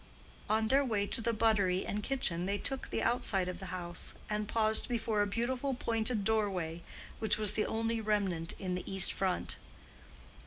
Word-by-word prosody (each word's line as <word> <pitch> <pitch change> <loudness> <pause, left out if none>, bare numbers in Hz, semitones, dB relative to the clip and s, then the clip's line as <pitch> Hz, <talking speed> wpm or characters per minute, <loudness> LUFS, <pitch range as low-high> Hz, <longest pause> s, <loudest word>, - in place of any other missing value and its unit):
On 220 +1 +3
their 270 +4 +4
way 215 -6 +1
to 230 - -3
the 235 +1 +1
buttery 210 -5 +2
and 210 - -2
kitchen 190 -9 0
they 200 +1 +1
took 270 +4 -3
the - - -1
outside 205 -6 +1
of 180 - -4
the 190 - -7
house 175 -1 -4 0.2
and 210 0 -1
paused 220 0 +1
before 225 -3 +1
a 205 - +2
beautiful 250 +5 -1
pointed 225 -2 +1
doorway, 190 -6 0 0.4
which 215 -2 +3
was 210 -1 0
the 215 - +1
only 225 +1 0
old 220 - -7
remnant 190 -6 +1
in 185 -2 -3
the 180 - -4
east 195 -1 +3
front. 185 -2 0
210 Hz, 185 wpm, -33 LUFS, 190-230 Hz, 0.4 s, their